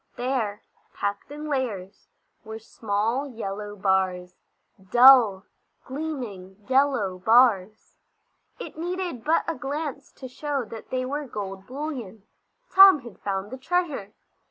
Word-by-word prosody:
There, 240 -5 -2 0.3
packed 200 0 -3
in 300 +1 -7
layers, 225 -10 -4 0.4
were 220 -1 -7
small 225 +4 -2
yellow 210 -3 -6
bars; 190 -2 0 0.6
dull, 240 -5 +7 0.4
gleaming, 255 -10 -6
yellow 260 -9 +1
bars! 220 -1 +3 0.6
It - - -9
needed 350 -7 -4
but 320 +4 +2
a 330 - 0
glance 285 -1 -5
to 260 - -9
show 275 0 -3
that 220 0 -10
they 255 0 -2
were 285 +2 -4
gold 195 -4 -7
bullion. 255 -8 -6 0.5
Tom 385 -6 +9
had 235 -5 -12
found 195 0 -3
the 260 - -7
treasure. 300 - -2
245 Hz, 120 wpm, -25 LUFS, 200-280 Hz, 0.6 s, Tom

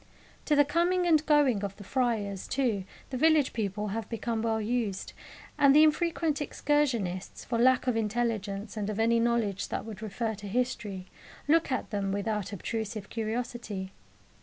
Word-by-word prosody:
To 300 - +3
the 290 0 +5
coming 345 +4 +2
and 315 -3 +4
going 280 -9 +4
of 200 -1 -3
the 205 - -11
friars, 210 -5 -1
too, 235 -8 0 0.3
the 255 - -2
village 310 -1 +4
people 210 -1 -2
have 220 +1 -4
become 230 -1 -2
well 225 -1 0
used, 220 -3 -2 0.5
and 280 -1 +6
the 305 - +8
infrequent 315 -1 +1
excursionists, 250 -12 -1
for 235 -2 -1
lack 255 +1 +4
of 250 -2 +1
intelligence 215 -2 -2
and 210 -1 -2
of 215 0 -3
any 230 +1 +3
knowledge 230 -4 0
that - - -4
would 215 -3 -8
refer 220 +1 -2
to 205 0 -8
history, 210 -4 -2 0.4
look 320 -1 +3
at 255 - -2
them 200 -2 -1
without 205 0 -2
obtrusive 215 +1 -4
curiosity. 225 -4 -4
230 Hz, 160 wpm, -29 LUFS, 205-260 Hz, 0.5 s, the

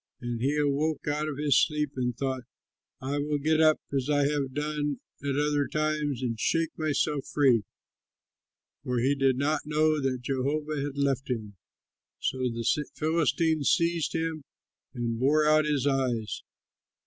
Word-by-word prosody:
And 120 -3 -4
he 140 +4 +1
awoke 150 +2 0
out 150 +1 0
of 145 - -5
his 145 -3 +4
sleep 150 -3 -1
and 125 -2 -2
thought, 130 -2 -2 0.6
"I 140 +2 -2
will 145 +1 0
get 155 +2 +2
up 155 -1 +5 0.2
as 135 +1 0
I 145 -1 +3
have 140 -2 0
done 150 0 -2 0.2
at 140 -1 -1
other 145 -1 +1
times 150 -4 -1
and 115 -3 -2
shake 165 +4 +1
myself 150 -2 -1
free"; 125 -8 +3 1.2
for 125 -1 -1
he 130 +4 +2
did 135 -2 +2
not 145 +2 +1
know 155 0 +2
that 130 -2 -1
Jehovah 145 +3 -1
had 140 0 -4
left 140 -1 0
him. 110 -5 -3 0.6
So 130 - -2
the 115 -2 -2 0.3
Philistines 160 -1 +1
seized 170 -1 +1
him 160 -2 -2 0.5
and 115 -2 -2
bored 150 +4 +3
out 155 0 +4
his 145 -3 0
eyes. 130 -6 0
145 Hz, 155 wpm, -28 LUFS, 130-150 Hz, 1.2 s, up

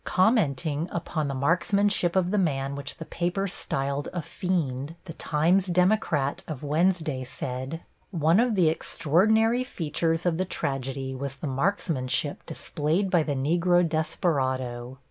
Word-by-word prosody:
Commenting 170 - +1
upon 160 -3 -2
the 140 - -3
marksmanship 180 +5 +2
of 185 -1 +2
the 210 - +2
man 140 -6 0
which 140 0 -5
the 160 - -7
paper 180 +5 -1
styled 140 -4 -2
a 175 -3 -3
fiend, 155 -6 -2
the 165 - -7
Times 170 +6 +2
Democrat 180 -6 +1
of 150 -3 -6
Wednesday 155 -2 +1
said: 130 +5 -5 0.3
One 165 0 +3
of 240 -2 +2
the 180 -4 +4
extraordinary 220 - +2
features 165 - -1
of 170 -1 +1
the 185 - +1
tragedy 135 -5 -3
was 135 0 -5
the 140 - -7
marksmanship 145 -2 0
displayed 165 +6 -1
by 175 - +4
the 150 -2 -1
Negro 175 +5 +2
desperado. 130 -6 -1
160 Hz, 140 wpm, -26 LUFS, 140-180 Hz, 0.3 s, the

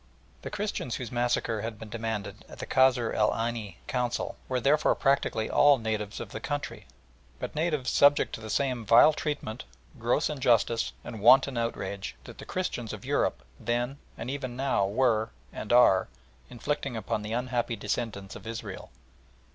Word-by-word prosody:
The - - -6
Christians 200 - -3
whose 125 -4 -5
massacre 120 -2 0
had 110 0 -5
been 110 0 -9
demanded 110 -3 -4
at - - -11
the - - -5
Kasr 125 -3 +3
el 105 0 +3
Aini 115 -5 -3
Council 125 -1 -2
were 130 -1 +1
therefore 140 +5 +3
practically 135 -5 +1
all 145 -1 +5
natives 110 -3 -3
of 115 - -6
the - - -5
country, 145 +5 -4 0.5
but - - -5
natives 150 -4 0
subject 145 0 +4
to - - -5
the 110 - -7
same 125 0 0
vile 115 +8 +7
treatment, 145 -8 -4 0.4
gross - - +1
injustice, 120 -5 +1
and 110 -3 -7
wanton 130 +4 +6
outrage 100 -4 -3
that - - -12
the - - -8
Christians 125 -11 -3
of - - -8
Europe - - 0 0.2
then 120 +4 -1 0.2
and 120 +3 -4
even 130 -3 -4
now 130 -7 +1
were, 110 0 +2 0.2
and 105 - -5
are, 120 -6 +6 0.4
inflicting 135 0 -3
upon 110 -1 -2
the 105 +1 -4
unhappy 120 -1 -1
descendants 105 -2 -4
of 105 - -10
Israel. 110 -4 -6
120 Hz, 165 wpm, -28 LUFS, 110-130 Hz, 0.5 s, vile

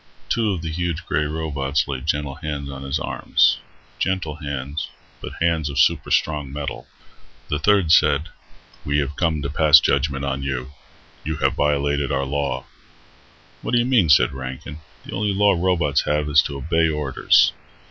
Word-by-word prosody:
Two 115 -2 +1
of 90 -4 -4
the 80 - -3
huge 85 0 -3
grey 75 +1 0
robots 75 -2 -2
laid 65 +1 -5
gentle 75 -2 -1
hands 75 -2 -5
on 65 0 -8
his 70 +2 -2
arms. - - +2 0.4
Gentle 90 -5 -2
hands, 70 -1 -5 0.3
but - - -7
hands 80 -3 +1
of 70 - -6
superstrong 75 -2 +1
metal. 70 -3 -6 0.6
The 75 - -1
third 95 -2 +3
said, 75 0 +4 0.5
"We 70 0 0
have 70 0 -1
come 80 -4 0
to 70 - -2
pass 75 -1 +7
judgement 70 -1 0
on 70 0 -2
you. 65 -1 -4 0.5
You 80 +1 -3
have 75 - +1
violated 70 -1 0
our 70 0 0
law." 70 -2 -2 1.0
"What - - -4
do - - +5
you 120 - +2
mean?" 120 -10 +3
said 70 - +5
Rankin. 65 +4 -7 0.3
"The - - -9
only 100 0 -1
law 100 0 +4
robots 85 -5 +1
have 75 0 0
is 75 0 +6
to 70 - -6
obey 80 +3 +1
orders." 75 -3 +3
75 Hz, 170 wpm, -22 LUFS, 70-80 Hz, 1.0 s, pass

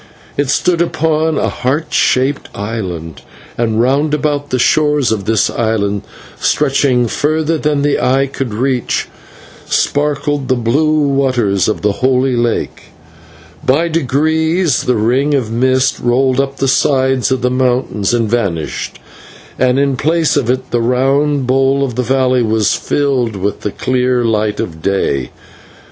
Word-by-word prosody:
It 145 -2 -1
stood 170 +4 +1
upon 160 -2 0
a - - 0
heart 140 +6 -2
shaped 135 +2 +1
island, 95 -7 -5 0.3
and 115 -2 0
round 140 +5 +2
about 145 -1 -2
the 130 - 0
shores 150 0 +2
of 100 -3 -2
this 110 -2 +2
island, 105 -3 -1 0.4
stretching 135 -4 +1
further 155 +5 0
than 150 -1 0
the 145 0 +1
eye 135 +2 +2
could 135 -2 -5
reach, 125 +3 -1 0.6
sparkled 145 -1 0
the 130 - +2
blue 150 +6 +1
waters 125 -9 +1
of 110 - -2
the 105 - +3
Holy 130 +3 +1
Lake. 120 -1 -2 0.8
By 160 +6 +2
degrees 160 +1 +1
the 125 - +2
ring 130 +7 +1
of 120 -5 -1
mist 130 +3 +1
rolled 130 +2 +1
up 135 0 -1
the 135 - 0
sides 130 -1 +2
of 130 -1 -1
the 125 - +1
mountains 125 -5 0
and 120 -2 +1
vanished, 100 -9 -2 0.6
and 125 0 +2
in 140 -1 +1
place 160 +3 +1
of 130 -5 0
it 130 +1 -2
the 120 - +1
round 135 +3 +1
bowl 135 +2 +2
of 130 -3 -2
the 125 - -1
valley 130 0 +1
was 110 -2 +1
filled 130 -6 -1
with 100 +1 -3
the - - -2
clear 125 0 0
light 105 -2 0
of 80 -2 -5
day. 70 -9 -1
130 Hz, 150 wpm, -15 LUFS, 115-145 Hz, 0.8 s, the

